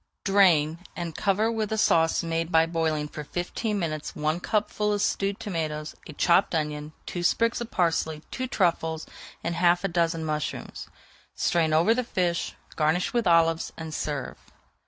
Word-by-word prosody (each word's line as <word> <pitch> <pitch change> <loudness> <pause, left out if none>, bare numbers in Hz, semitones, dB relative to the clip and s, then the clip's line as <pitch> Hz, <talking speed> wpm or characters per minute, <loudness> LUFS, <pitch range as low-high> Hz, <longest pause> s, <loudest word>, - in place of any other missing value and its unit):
Drain, 170 -6 +4 0.2
and 170 -3 -5
cover 210 +3 +1
with 220 -2 -2
a 220 - 0
sauce 165 -6 +3
made 165 0 -2
by 160 0 +5
boiling 160 -2 -1
for 150 0 -7
fifteen 190 +7 -3
minutes 155 -5 -3
one 155 +2 0
cupful 210 +1 0
of 205 - 0
stewed 200 0 0
tomatoes, 155 -5 -3
a 155 - -8
chopped 170 +4 +3
onion, 150 -1 -3
two 175 - -4
sprigs 230 +7 +2
of 235 - -5
parsley, 160 -4 0
two 255 0 -3
truffles, 165 -6 0 0.4
and 170 - -1
[Page 170 - -4
424] 175 0 +5
half 175 +1 +2
a - - +2
dozen 165 -2 +1
mushrooms. 150 -1 -4 0.5
Strain 165 -2 +1
over 165 +8 +4
the 250 +2 0
fish, 180 -7 -1 0.2
garnish 160 +3 +1
with 235 -4 +1
olives, 165 -1 +3
and 160 -1 -6
serve. 145 -4 -4
170 Hz, 170 wpm, -26 LUFS, 155-195 Hz, 0.5 s, by